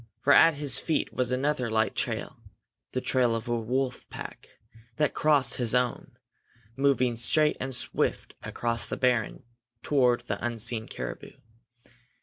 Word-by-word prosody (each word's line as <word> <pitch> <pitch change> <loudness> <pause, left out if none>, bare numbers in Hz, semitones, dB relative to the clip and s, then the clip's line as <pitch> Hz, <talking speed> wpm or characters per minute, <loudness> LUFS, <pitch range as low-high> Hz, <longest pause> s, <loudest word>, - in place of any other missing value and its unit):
For 140 +4 +4
at 165 +1 +7
his 145 -1 0
feet 160 - -1
was 125 -1 0
another 130 -1 0
light 110 0 +1
trail, - - -3 0.5
the 130 - -2
trail 125 -3 +2
of 115 +2 -5
a 120 -1 -1
wolf 125 +2 -2
pack, - - -9 0.5
that 150 +1 +1
crossed 145 -4 +2
his 120 -1 +1
own, 125 -1 -1 0.6
moving 135 -3 +2
straight 150 +6 +2
and 130 -1 -4
swift - - -2
across 115 0 -2
the - - -3
barren 125 -5 0 0.4
toward 125 -4 +2
the 100 -3 -4
unseen 115 -1 -1
caribou. - - -7
125 Hz, 140 wpm, -27 LUFS, 120-135 Hz, 0.6 s, at